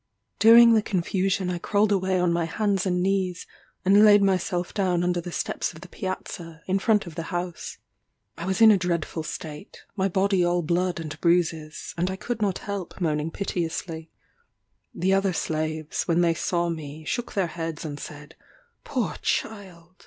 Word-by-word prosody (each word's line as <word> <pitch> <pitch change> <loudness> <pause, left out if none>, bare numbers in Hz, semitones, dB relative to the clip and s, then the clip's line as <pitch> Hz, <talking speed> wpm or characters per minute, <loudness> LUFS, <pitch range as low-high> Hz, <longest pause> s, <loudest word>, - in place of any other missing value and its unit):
During 230 +1 +8
the 220 - +4
confusion 190 0 0
I 175 - -3
crawled 205 +3 +1
away 190 -1 +1
on 180 -1 +2
my 170 -1 0
hands 195 +2 0
and 180 -1 +1
knees, 190 -2 0 0.4
and 200 +3 +6
laid 205 -1 +7
myself 185 -2 0
down 180 -3 +1
under 175 0 0
the 175 - -7
steps - - -2
of 165 - -13
the 185 - -10
piazza, 170 -3 -6
in 190 +1 +1
front 210 0 +2
of 170 - -9
the 165 - -4
house. 175 -1 -4 0.6
I 170 - -6
was 190 +4 -1
in 220 -1 +9
a 200 - +4
dreadful 170 -2 -2
state 155 +2 -8
my 190 -2 +1
body 190 0 +2
all 175 0 +1
blood 175 +2 0
and 155 -2 -7
bruises, 165 -3 0
and 180 +2 +1
I 190 - -3
could 220 +3 -4
not 200 -3 +1
help 200 -3 -5
moaning 155 -3 0
piteously. 165 -3 -4 0.8
The 185 +3 0
other 195 -1 +2
slaves, 155 -1 -2
when 170 0 +3
they 170 -1 +3
saw 170 +1 -1
me, 155 -1 -6
shook 240 +8 -3
their 195 -2 +1
heads 165 -1 -5
and 145 -2 -5
said, 145 +1 -9 0.5
"Poor - - -2
child! 185 -4 -4
180 Hz, 175 wpm, -25 LUFS, 165-195 Hz, 0.8 s, in